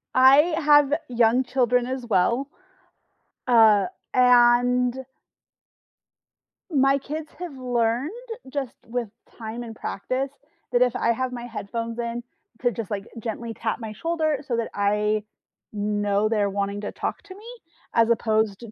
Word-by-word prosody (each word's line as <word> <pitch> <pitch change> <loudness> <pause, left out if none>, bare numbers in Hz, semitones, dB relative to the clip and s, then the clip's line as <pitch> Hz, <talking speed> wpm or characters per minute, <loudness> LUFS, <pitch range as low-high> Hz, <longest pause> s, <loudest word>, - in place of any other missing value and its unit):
I 260 +2 +7 0.2
have 290 -2 +5 0.2
young 240 +1 +3
children 250 -1 +1
as 260 -1 -4
well, 235 +7 +1 1.0
uh, 220 -5 +6 0.3
and 250 +1 +4 1.7
my 275 -1 +4
kids 300 +3 -6
have 335 -7 -7
learned 245 - 0 0.4
just, 275 -4 -3
with 235 -2 -3 0.3
time 230 +1 -6
and 225 -1 -9
practice 255 +7 -3 0.4
that 245 0 +2
if 250 -1 +3
I 235 - +2
have 255 +2 -2
my 240 -1 -6
headphones 230 0 -5
in, 235 0 -3 0.4
to 245 - +3
just, 225 -2 -6
like, 200 0 -3
gently 230 +1 -5
tap 225 0 -2
my 220 -2 -6
shoulder 315 +1 -1
so 235 -2 -1
that 230 - -2
I 210 +1 +1 0.5
know 205 0 0
they're 210 -2 +1
wanting 200 +1 -2
to 205 - -4
talk - - -4
to 380 -1 -12
me 420 +3 -14 0.5
as 230 0 +4
opposed 220 -3 +1
t 230 -3 -10
240 Hz, 140 wpm, -24 LUFS, 220-260 Hz, 1.7 s, I